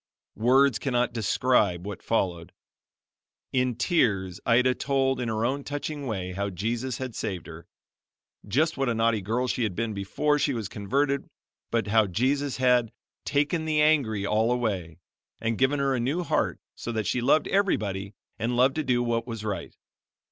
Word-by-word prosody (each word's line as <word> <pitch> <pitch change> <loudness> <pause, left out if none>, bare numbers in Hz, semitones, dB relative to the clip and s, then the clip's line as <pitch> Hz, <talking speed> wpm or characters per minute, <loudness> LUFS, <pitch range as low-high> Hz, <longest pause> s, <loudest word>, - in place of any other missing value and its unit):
Words 130 +4 +4
cannot 125 -3 0
describe 105 -4 +1
what 100 -1 -6
followed. 90 -7 -1 1.0
In 125 -2 +1
tears, 100 - +1
Ida 125 +2 +4
told, 135 -1 0
in 120 - -2
her 110 +1 0
own 140 +3 -1
touching 145 0 -4
way, 95 -5 -3
how 100 +2 -2
Jesus 115 +6 -2
had 130 -2 -5
saved 95 -8 -4
her 80 +1 -11 0.8
just 155 +10 +1
what 135 -2 +1
a 115 - 0
naughty 115 -1 +2
girl 115 +6 -1
she 125 - -1
had 105 -6 -1
been 115 -1 -2
before 145 +10 0
she 140 -2 +1
was 110 -4 -3
converted 135 +8 -1 0.4
but 115 -3 0
how 110 0 +3
Jesus 135 +8 0
had 125 -3 +3 0.3
"taken 150 +3 0
the 155 -1 +1
angry 135 -10 +3
all 110 +3 +2
away" 100 -10 -2 0.4
and 115 -1 -2
given 135 +2 +3
her 140 -1 +1
a 130 - 0
new 145 +9 0
heart - - 0
so 120 - -6
that 110 -2 -2
she 125 - 0
loved 140 +6 +3
everybody 100 - 0 0.2
and 120 +2 -1
loved 130 +2 +4
to 155 - 0
do 125 -3 +1
what 115 0 -1
was 115 -3 -5
right. 105 -2 -4
120 Hz, 170 wpm, -27 LUFS, 105-135 Hz, 1.0 s, Words